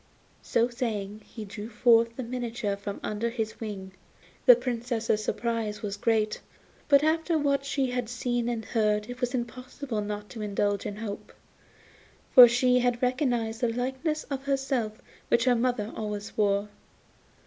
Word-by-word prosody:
So 230 +1 +2
saying 215 -4 -4
he 220 -2 -8
drew 205 +2 -7
forth 230 0 +4
the 255 - -4
miniature 235 -4 -3
from 200 0 -6
under 215 +2 -1
his 225 -2 -4
wing. 200 -4 -6 0.6
The - - +11
Princess's 235 - -1
surprise 225 -1 -2
was 200 -1 -2
great, 215 0 0 0.5
but 280 0 +6
after 320 +1 +2
what 280 -2 +1
she 275 -2 0
had 245 -2 -2
seen 240 -1 -1
and 230 -2 -3
heard 210 0 0
it 245 +1 -9
was 250 +1 0
impossible 250 0 -4
not 210 0 -5
to 225 - -7
indulge 205 0 0
in 205 - -5
hope, 210 -1 -6 1.0
for 250 -2 +12
she 250 +1 +3
had 245 0 0
recognised 245 -3 0
the 240 -2 +2
likeness 265 +6 -2
of 275 -1 -5
herself 265 -5 -1 0.3
which 235 0 +3
her 250 - +5
mother 235 -3 -1
always 210 -1 -5
wore. 205 -1 +1
235 Hz, 155 wpm, -28 LUFS, 210-250 Hz, 1.0 s, for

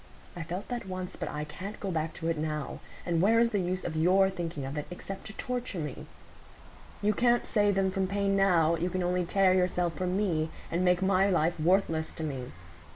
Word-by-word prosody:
I 175 - -5
felt 175 +4 -5
that 240 -4 -4
once; 185 0 -5
but - - -4
I 150 0 -3
can't 185 +7 -7
go 195 - -3
back 160 -1 -2
to 165 - -4
it 165 - +1
now. 150 -1 -3 0.3
And 170 -2 +1
where 225 +4 +5
is 230 0 +3
the 205 - +1
use 185 0 -2
of 160 - -3
your 190 +4 +4
thinking 165 -6 -4
of 135 +2 -5
it, 150 - -4
except 190 +2 -7
to 215 - -8
torture 245 -3 -4
me? 150 -5 -5 1.0
You 210 +1 +3
can't 240 +2 +3
save 205 -2 +2
them 190 -1 +2
from 190 0 0
pain 200 0 +1
now; 175 -4 +4
you 175 +2 -1
can 185 0 -1
only 180 0 +1
tear 190 +1 +4
yourself 180 -2 +1
from 180 +3 -1
me, 165 -6 0 0.2
and 175 +2 +1
make 180 0 +3
my 195 +1 +3
life 170 -2 +1
worthless 165 -1 +2
to 160 - -6
me. 135 -5 -4
180 Hz, 220 wpm, -29 LUFS, 165-195 Hz, 1.0 s, where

